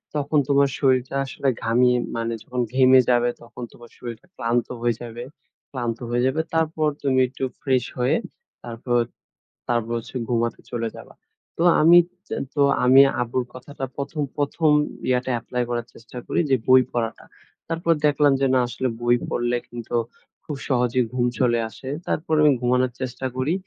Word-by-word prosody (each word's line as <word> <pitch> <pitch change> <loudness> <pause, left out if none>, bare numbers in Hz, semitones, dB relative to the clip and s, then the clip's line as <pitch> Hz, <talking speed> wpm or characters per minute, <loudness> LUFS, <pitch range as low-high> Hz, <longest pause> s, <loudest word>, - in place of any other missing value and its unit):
তখন 150 +1 0
তোমার 140 -1 +4
শরীরটা 130 -1 +1
আসলে 135 0 -4 0.2
ঘামিয়ে 125 +2 +3 0.2
মানে 115 0 -2
যখন 125 0 -3
ঘেমে 130 0 +6
যাবে, 120 0 +3
তখন 120 +1 -10
তোমার 120 -1 -15
শরীরটা 120 +6 -8
ক্লান্ত 120 0 0
হয়ে 120 -2 +1
যাবে, 120 +1 -7 0.5
ক্লান্ত 120 -3 -3
হয়ে 120 +1 +1
যাবে। 155 +4 +1
তারপর 160 -1 +1 0.2
তুমি 130 -2 +2
একটু 130 +1 -8 0.2
ফ্রেশ 130 -3 +1 0.2
হয়ে 125 - +2 0.5
তারপর, 120 +1 -1 0.7
তারপর 120 -1 0
হচ্ছে 115 - -9
ঘুমাতে 115 -1 0
চলে 115 -1 -2
যাবা। - - -12 0.4
তো 165 - +1 0.2
আমি 170 +3 +8 0.3
তে - - -4 0.2
তো 145 - +1 0.2
আমি 130 +2 +8 0.2
আব্বুর 120 +1 -1
কথাটা 135 +1 -7
প্রথম, 145 +2 -4 0.2
প্রথম 150 +2 +1 0.4
ইয়াটা 125 0 +1
এপ্লাই 125 +1 -2
করার 120 0 -2
চেষ্টা 115 +2 -13
করি - - -1
যে, 135 - +5
বই 130 0 +7
পড়াটা। 115 -3 -3 0.4
তারপর 165 0 +1
দেখলাম 145 -1 +4
যে 135 - +4
না, 130 - +4
আসলে 130 +2 -2
বই 120 0 +4
পড়লে 120 0 0
কিন্তু 120 0 -6 0.5
খুব 150 - -4
সহজেই 125 -1 +2
ঘুম 125 -1 +1
চলে 120 -2 +3
আসে। 130 - -9 0.2
তারপর 160 0 -2
আমি 150 -1 +6
ঘুমানোর 125 0 +2
চেষ্টা 130 +1 -4
করি 130 +5 0
125 Hz, 160 wpm, -23 LUFS, 120-140 Hz, 0.7 s, আমি